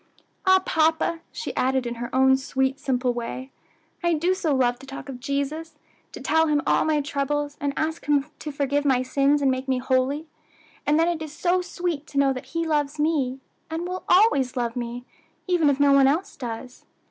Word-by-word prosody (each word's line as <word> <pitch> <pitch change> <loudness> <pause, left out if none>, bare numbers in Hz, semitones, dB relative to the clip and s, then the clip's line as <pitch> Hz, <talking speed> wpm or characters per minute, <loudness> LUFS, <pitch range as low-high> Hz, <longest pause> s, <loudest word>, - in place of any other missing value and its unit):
"Ah, 375 0 +6
papa," 320 +1 +2
she - - -5
added 260 0 +1
in 235 - -2
her 240 - -3
own 265 0 +5
sweet, 265 +1 -1
simple 255 -3 0
way, 250 +3 -5 0.5
"I 345 -1 +3
do 345 +4 +1
so 325 -6 0
love 245 -2 +1
to 270 - -13
talk 275 +1 -8
of 255 -2 -7
Jesus; 285 +4 -3 0.3
to - - -9
tell 320 0 +2
Him 300 -1 +2
all - - +3
my 310 -1 +2
troubles, 285 +1 -2
and 285 -1 0
ask 315 +1 -2
Him 285 -2 +3
to 300 - -5
forgive 285 0 0
my 260 -3 +2
sins 280 +2 +2
and 270 - +4
make 260 +1 -3
me 260 -1 +1
holy; 260 +4 0 0.6
and 300 +2 +4
then 330 - +3
it 340 -2 -1
is 310 -2 -6
so 360 +4 +1
sweet 350 -4 -3
to 280 - -7
know 275 -1 +4
that 255 - -7
He 330 - 0
loves 295 -2 0
me, 275 -4 0 0.3
and 325 +2 -3
will 365 +1 -5
always 285 - +4
love 235 -1 -1
me, 240 0 -5 0.4
even 350 -5 +3
if 280 -1 +1
no 285 -1 +5
one 275 -1 +6
else 320 +8 0
does." 245 0 -7
285 Hz, 205 wpm, -24 LUFS, 260-315 Hz, 0.6 s, Ah